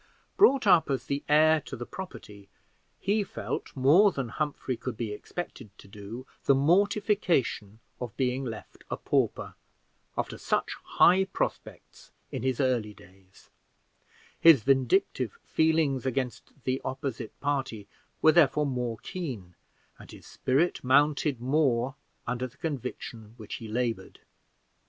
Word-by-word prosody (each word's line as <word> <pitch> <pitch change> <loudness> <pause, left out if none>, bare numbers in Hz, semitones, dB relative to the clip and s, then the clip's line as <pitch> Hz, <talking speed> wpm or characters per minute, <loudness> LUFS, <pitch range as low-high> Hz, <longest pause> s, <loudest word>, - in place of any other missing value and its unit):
Brought 275 - +5
up 180 -6 +5
as 135 -2 -1
the 140 0 -2
heir 155 +1 +5
to - - -8
the 120 - -6
property, 105 - -10 0.5
he 205 +2 +1
felt, - - -5
more 155 +10 +5
than 135 -7 -4
Humphrey 145 -2 -3
could 120 0 -6
be 115 -3 -3
expected 125 +1 -7
to - - -15
do, 105 +5 -9 0.2
the 140 - +5
mortification 175 - +1 0.2
of 120 -4 -6
being 130 0 0
left 115 -4 -8
a - - -3
pauper, - - -1 0.6
after - - -3
such - - -1
high 190 +2 +4
prospects 190 - -5 0.2
in - - -4
his 130 -1 -1
early 120 -6 0
days: 95 +1 -20 0.9
his 160 -9 +7
vindictive 135 - +2
feelings 160 -5 +1
against 130 -1 -3
the 130 +1 -1
opposite 130 -4 -5
party 135 -7 -2 0.4
were 155 - +8
therefore 150 -3 +4
more 125 -4 -2
keen, 125 - -6 0.5
and - - -13
his - - -13
spirit 145 +7 0
mounted 145 +1 +3
more 130 -1 +1 0.3
from 120 0 -2
the 130 0 -3
conviction 125 -4 -5
under 105 +1 -17
which 110 -3 -9
he 115 - -8
labored. 115 -3 -3
130 Hz, 135 wpm, -28 LUFS, 115-155 Hz, 0.9 s, were